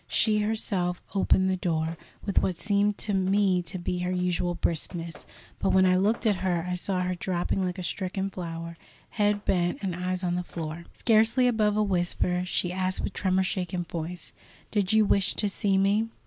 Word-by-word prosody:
She 215 -1 +2
herself 200 -4 -1
opened 190 -1 +3
the 190 - +2
door, 165 -2 -1 0.3
with 200 - +2
what 180 -3 -1
seemed 205 +1 +1
to 210 - -1
me 190 -1 +2
to 175 +2 -6
be 180 0 -2
her 180 0 -1
usual 180 -1 0
briskness; 165 0 -3 0.3
but - - +1
when 190 0 +5
I 185 0 +4
looked 210 +6 +1
at 210 -3 +3
her, 180 -3 -1
I 180 - -1
saw 180 +1 -1
her 180 0 0
drooping 180 +1 -1
like 180 0 -2
a 185 - -5
stricken 190 +2 -3
flower, 170 -2 -6 0.3
head 205 -1 +1
bent, 175 -2 +1
and 185 -3 -1
eyes 185 +1 -2
on 175 -1 0
the 180 0 -1
floor. 165 -1 -6
Scarcely 225 +3 +3
above 215 -4 +2
a 215 - +3
whisper, 180 -2 0
she 180 -1 -1
asked 185 0 -1
with - - -3
tremor 190 -1 +1
shaken 180 -1 -2
voice: 170 +1 -6 0.4
"Did 200 -3 +1
you 220 0 +5
wish 200 -1 +2
to 210 - +1
see 195 0 +1
me?" 200 +3 +2
185 Hz, 190 wpm, -27 LUFS, 175-200 Hz, 0.4 s, when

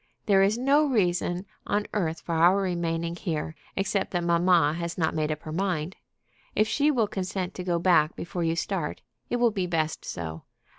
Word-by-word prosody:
There 195 -2 +5
is 200 +3 +3
no 275 +4 +4
reason 180 -6 0 0.2
on 205 0 0
earth 165 -6 -1
for 170 - -4
our 170 +4 +5
remaining 170 -3 -1
here, 160 -3 -3 0.2
except 195 0 0
that 175 -2 -1
mamma 170 -3 +4
has 170 0 -4
not 160 -3 +1
made 155 -1 0
up 150 0 -4
her 155 - -6
mind. 180 -1 -1 0.6
If 215 - +3
she 290 +6 +2
will 240 -7 +2
consent 185 -1 -3
to 180 - -6
go 175 -1 0
back 170 -3 +3
before 175 0 -4
you 165 0 +1
start, 170 -2 -3 0.3
it - - 0
will 240 -1 +3
be 190 -4 -2
best 160 -2 -1
so. 80 -1 -5
175 Hz, 190 wpm, -27 LUFS, 165-195 Hz, 0.6 s, There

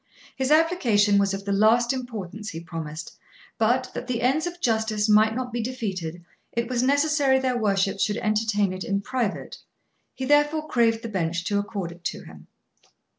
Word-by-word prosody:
His 265 0 -1
application 245 - +3
was 200 -1 +2
of 195 0 -5
the 200 - -2
last 225 +5 +4
importance, 220 -5 -6
he 165 - -6
promised, 165 -2 -7 0.4
but, 250 +3 +1
that 250 - -6
the 240 -2 -2
ends 295 +7 +2
of 350 0 -7
justice 220 -4 0
might 215 +1 +4
not 250 -1 -4
be 240 - -1
defeated 190 -9 -4 0.3
it 235 0 -1
was 245 -1 0
necessary 285 0 +3
their 260 -1 0
worships 195 -3 0
should 210 +1 +1
entertain 215 -2 +1
it 185 0 -5
in 200 0 -1
private; 235 -2 -3 0.6
he 260 - -4
therefore 295 +2 +2
craved 230 -3 +2
the - - -3
bench 170 -5 -2
to 205 -1 +1
accord 200 -4 -4
it 170 0 -15
to - - -3
him. - - -14
220 Hz, 175 wpm, -25 LUFS, 200-255 Hz, 0.6 s, last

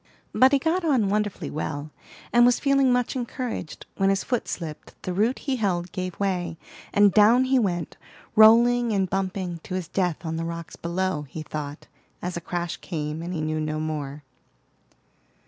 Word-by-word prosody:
But 260 +1 +6
he 280 - +5
got 330 +6 0
on 260 -11 +2
wonderfully 210 -1 -1
well, 150 0 -4 0.4
and 240 0 +6
was 245 0 +5
feeling 275 -2 +3
much 245 +2 +1
encouraged, 245 -7 -4
when 195 0 +3
his 195 0 +1
foot 245 -2 -1
slipped, 160 -4 -7
the 185 - -3
root 220 +7 +1
he 270 -3 -2
held 180 -5 -1
gave 185 -1 -5
way, 180 -4 -1 0.3
and 205 -2 +5
down 225 +4 +6
he 260 0 +3
went, 175 -7 -2 0.4
rolling 235 +2 +6
and 195 -2 +1
bumping 185 -2 -2
to 185 - -6
his 185 -3 -3
death 180 -2 -1
on 160 0 -2
the 165 - -2
rocks 170 0 -6
below, 170 -3 -2
he 155 +4 -6
thought, 150 -1 -6 0.3
as 180 0 -4
a 170 - -4
crash 175 -1 -3
came, 155 -2 -4
and 170 +2 -5
he 165 -3 -2
knew 155 0 -1
no 155 0 -2
more. 150 -2 -4
185 Hz, 180 wpm, -25 LUFS, 165-235 Hz, 0.4 s, But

